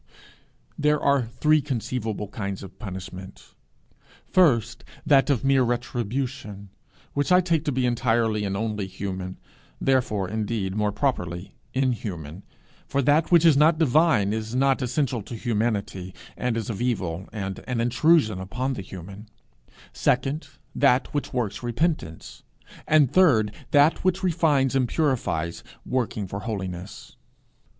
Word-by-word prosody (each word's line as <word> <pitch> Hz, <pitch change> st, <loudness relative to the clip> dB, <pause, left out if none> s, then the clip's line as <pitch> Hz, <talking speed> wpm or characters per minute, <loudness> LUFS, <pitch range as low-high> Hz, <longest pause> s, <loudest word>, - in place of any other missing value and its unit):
There 150 Hz, 0 st, +3 dB
are 140 Hz, -1 st, +3 dB
three 150 Hz, +6 st, +2 dB
conceivable 115 Hz, -6 st, -3 dB
kinds 100 Hz, -3 st, -5 dB
of 95 Hz, -, -12 dB
punishment 95 Hz, -2 st, -9 dB, 0.7 s
first, 120 Hz, -, +2 dB, 0.2 s
that 140 Hz, 0 st, +4 dB
of 135 Hz, -4 st, +1 dB
mere 135 Hz, -1 st, +4 dB
retribution, 120 Hz, -3 st, -3 dB, 0.4 s
which 145 Hz, +5 st, 0 dB
I 180 Hz, -, +7 dB
take 170 Hz, -4 st, +1 dB
to 145 Hz, -, +1 dB
be 130 Hz, -1 st, 0 dB
entirely 115 Hz, -3 st, +1 dB
and 100 Hz, -1 st, -2 dB
only 105 Hz, -2 st, -2 dB
human 95 Hz, -1 st, -5 dB, 0.4 s
therefore, 120 Hz, -7 st, +1 dB
indeed, 105 Hz, -1 st, -2 dB
more 105 Hz, -1 st, +1 dB
properly 90 Hz, -8 st, -2 dB, 0.2 s
inhuman, 100 Hz, -, -2 dB, 0.5 s
for 140 Hz, 0 st, 0 dB
that 150 Hz, +6 st, +3 dB
which 170 Hz, -1 st, +6 dB
is 160 Hz, -4 st, +7 dB
not 155 Hz, +3 st, +5 dB
divine 145 Hz, -9 st, +3 dB
is 110 Hz, +2 st, -4 dB
not 135 Hz, +1 st, +2 dB
essential 125 Hz, -1 st, -1 dB
to 115 Hz, -, -8 dB
humanity, 105 Hz, -5 st, -2 dB, 0.2 s
and 125 Hz, -2 st, -1 dB
is 115 Hz, 0 st, -3 dB
of 105 Hz, -, -5 dB
evil, 95 Hz, -8 st, -2 dB
and 95 Hz, -3 st, -4 dB
an 125 Hz, -2 st, -1 dB
intrusion 120 Hz, -, +3 dB
upon 120 Hz, +8 st, -3 dB
the 125 Hz, -, -5 dB
human; 95 Hz, +3 st, -10 dB, 0.6 s
second, 135 Hz, +5 st, 0 dB, 0.3 s
that 135 Hz, -2 st, +2 dB
which 145 Hz, -, -2 dB
works 115 Hz, -6 st, -2 dB
repentance; 120 Hz, -, -2 dB, 0.5 s
and 150 Hz, -3 st, +4 dB
third, 120 Hz, -, +4 dB, 0.2 s
that 145 Hz, +1 st, +4 dB
which 185 Hz, +1 st, +1 dB
refines 150 Hz, -7 st, +2 dB
and 130 Hz, -2 st, +2 dB
purifies, 115 Hz, -, -1 dB, 0.2 s
working 120 Hz, -5 st, -1 dB
for 100 Hz, +2 st, -5 dB
holiness. 95 Hz, -4 st, -6 dB
120 Hz, 135 wpm, -25 LUFS, 100-140 Hz, 0.7 s, I